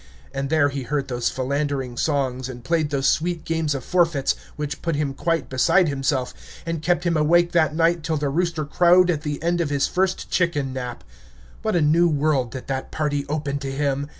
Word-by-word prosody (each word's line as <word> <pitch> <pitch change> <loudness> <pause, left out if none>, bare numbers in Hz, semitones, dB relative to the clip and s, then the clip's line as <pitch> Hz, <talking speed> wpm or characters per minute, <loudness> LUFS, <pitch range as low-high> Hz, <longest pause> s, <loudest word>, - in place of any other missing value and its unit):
And 135 0 -3
there 155 -2 +3
he 140 -1 -4
heard 140 +2 -2
those 120 -1 0
philandering 135 -1 -2
songs, 130 -2 -1
and 125 -2 -9
played 160 -1 0
those 140 -2 -1
sweet 170 +1 0
games 160 -3 0
of 135 - -5
forfeits, 165 -6 +2 0.2
which 150 -1 -4
put 165 -2 -1
him 145 -2 -1
quite 165 +3 -1
beside 160 +7 +3
himself, 135 -2 -1 0.3
and 165 -2 -3
kept 175 +2 +1
him 170 -1 +1
awake 170 +3 +3
that 160 -3 +2
night 165 +1 +2
till 160 0 -1
the 145 -1 -1
rooster 170 +1 -1
crowed 175 +4 +4
at 155 -3 -2
the 150 -1 -3
end 170 +1 +1
of 160 - -1
his 140 -1 +1
first 185 0 -1
chicken 150 -7 0
nap. 125 -2 -5 0.6
What 220 -3 -1
a 175 - +3
new 160 +4 +4
world 145 -4 +1
did 130 +3 -7
that 135 -1 -4
party 145 -2 -1
open 145 -2 -2
to 135 -1 -4
him! 140 0 -1
150 Hz, 205 wpm, -23 LUFS, 135-165 Hz, 0.6 s, crowed